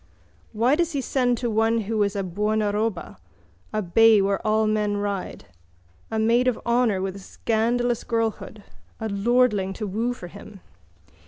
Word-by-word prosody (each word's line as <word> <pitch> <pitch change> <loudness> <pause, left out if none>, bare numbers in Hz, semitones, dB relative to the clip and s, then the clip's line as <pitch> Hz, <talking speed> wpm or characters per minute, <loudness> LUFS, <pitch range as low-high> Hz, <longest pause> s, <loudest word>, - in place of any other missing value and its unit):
Why 235 +4 +2
does 335 +1 +1
he 285 - -1
send 250 -2 0
to 240 0 -2
one 225 +1 +2
who 215 +1 -2
is 200 -1 0
a 200 - -1
buonaroba, 210 - -1 0.5
a 215 0 -1
bay 220 +4 +5
where 195 0 +1
all 215 0 +1
men 210 -1 0
ride, 200 -2 -4 0.6
a 220 - -3
maid 230 +3 +3
of 250 - +1
honour 235 -4 +2
with 195 0 -4
a - - -9
scandalous 235 +4 -1
girlhood, 225 -2 -3 0.4
a 220 - -3
lordling 205 -2 +1
to 215 - -5
woo 225 +5 -1
for 215 - -10
him? 200 +2 -12
220 Hz, 160 wpm, -24 LUFS, 200-235 Hz, 0.6 s, bay